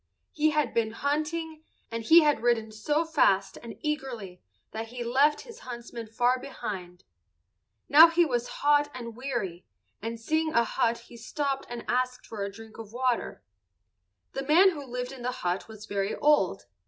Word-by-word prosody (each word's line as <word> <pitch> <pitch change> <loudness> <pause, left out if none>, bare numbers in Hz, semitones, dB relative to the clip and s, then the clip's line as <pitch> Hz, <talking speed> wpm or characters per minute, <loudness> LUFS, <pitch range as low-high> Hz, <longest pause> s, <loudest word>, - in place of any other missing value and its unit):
He 310 +1 +2
had 300 -5 0
been 225 -1 0
hunting, 310 +4 -2 0.3
and 230 0 -3
he 330 +8 +8
had 295 -7 +2
ridden 230 -2 +1
so 295 +10 0
fast 200 -12 +2
and 235 -1 -9
eagerly 250 - -4 0.3
that 225 +1 -5
he 245 +2 -13
had - - -8
left 280 +5 +3
his 465 -2 -12
huntsmen 235 -2 -8
far 245 +3 +1
behind. 190 -9 -7 0.8
Now 310 +4 +9
he 335 +1 +3
was 245 -5 -1 0.2
hot 290 0 +4
and 235 -3 -7
weary, 235 -9 -4 0.4
and 230 +2 -4
seeing 315 +6 0
a 235 - +5
hut 230 +1 0
he 235 - -13
stopped 275 +4 -3
and 240 -1 -6
asked 250 0 -1
for 215 -3 -5
a 200 - -4
drink 220 +2 -13
of 220 -2 -9
water. 250 0 -1 0.9
The 270 - -3
man 365 +6 +6
who 295 -5 -7
lived 250 -1 -5
in 265 -2 -10
the 250 +1 -1
hut 180 +2 -1
was 215 -1 -11
very 200 -1 -2
old. 295 0 +2
245 Hz, 175 wpm, -28 LUFS, 225-295 Hz, 0.9 s, Now